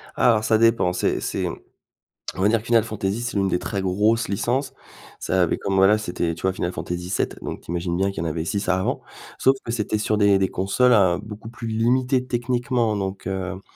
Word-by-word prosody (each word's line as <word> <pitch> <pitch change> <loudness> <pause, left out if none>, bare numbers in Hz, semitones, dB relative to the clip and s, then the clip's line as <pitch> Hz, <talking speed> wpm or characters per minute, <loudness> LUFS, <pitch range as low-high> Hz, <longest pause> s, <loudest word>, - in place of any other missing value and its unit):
Alors 110 -3 +3
ça 110 - +3
dépend. 115 -6 +3
C'est - - 0
c'est, - - -2
on - - -10 0.6
va 100 - +4
dire 115 +1 +3
que 110 - -14
Final 115 -2 +4
Fantasy 105 -1 -3
c'est 120 -3 -3
une 100 -1 +2
des 90 - +1
très 100 +1 -3
grosses 105 +5 +2
licences. 120 +7 -1 0.5
Ça 95 -1 +1
avait 85 - 0
comme 100 -1 -2
voilà, 95 +3 +5
c'était 90 -4 -2
tu 85 - -10
vois, 95 0 +1
Final 90 -1 -2
Fantasy 90 0 -5
VII, - - 0
donc - - -5
tu - - -22
imagines 85 0 -2
bien 95 +2 +1
qu'il 80 - -4
y 85 - -2
en - - 0
avait 80 +1 -3
6 100 +3 -2
avant, 95 0 0 0.4
sauf 135 - +4
que 115 - -4
c'était 110 -2 -1
sur 110 0 0
des 100 -2 +4
des 95 - +2
consoles 125 +6 +2
à 95 -5 +4
beaucoup 105 +1 -9
plus 115 0 -7
limitées 125 +3 +1
techniquement, 120 -2 0
donc, 95 -1 -4
heu, 95 0 -4
105 Hz, 220 wpm, -23 LUFS, 95-115 Hz, 0.6 s, voilà